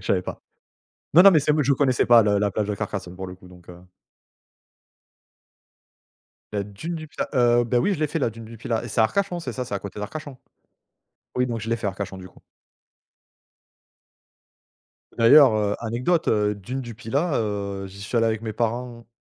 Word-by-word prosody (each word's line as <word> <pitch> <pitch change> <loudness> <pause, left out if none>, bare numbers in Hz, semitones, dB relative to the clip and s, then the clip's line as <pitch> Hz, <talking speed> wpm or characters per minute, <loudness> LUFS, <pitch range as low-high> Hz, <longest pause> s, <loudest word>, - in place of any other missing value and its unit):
savais 90 -2 +1
pas. - - -7 0.7
Non, 175 - +9
non, 195 - +9
mais 165 - +5
c'est 150 +1 +1
m 150 0 +2
je 140 - +2
connaissais 130 -2 +2
pas 120 -1 +7
le 100 -1 +2
la 105 0 +1
plage 105 +2 -2
de 105 - -2
Carcassonne 95 -2 -5
pour 95 0 -7
le 90 - -9
coup 90 - -17
donc 90 -1 -17
heu 90 0 -11 2.7
La 100 -1 -2
dune 130 - -6
du 155 -1 -7
Pilat? - - -5
Heu, 120 -2 +3
beh, 120 +1 -1
oui, 200 +9 +1
je 160 - -7
l'ai 155 - +2
fait 165 - -2
la 135 - +1
dune 115 +1 -11
du 115 +1 -11
Pilat 110 0 -2
et - - -6
c'est 115 - 0
à - - +6
Arcachon, 190 - -1
c'est 165 - -5
ça? 125 - -4
C'est 125 - -5
à 100 - -1
côté 100 +1 -8
d'Arcachon? 145 +6 -7 1.0
Oui, 125 0 +2
donc 115 -2 -3
je 110 - -6
l'ai 115 - +1
fait 110 - -4
Arcachon, 95 0 -4
du 95 0 -10
coup. - - -21 2.8
D'ailleurs, 125 +3 +7
heu, 105 -1 0
anecdote, 125 +9 0
heu, 105 -1 +2
dune 115 +7 -6
du 120 -3 -8
Pilat, 135 +9 -2
heu, 100 -3 -3
j'y 100 +1 -13
suis 105 +4 -4
allé 115 0 +3
avec 110 -1 -1
mes 110 -1 -4
parents 115 +1 -3
115 Hz, 205 wpm, -24 LUFS, 100-130 Hz, 2.8 s, Non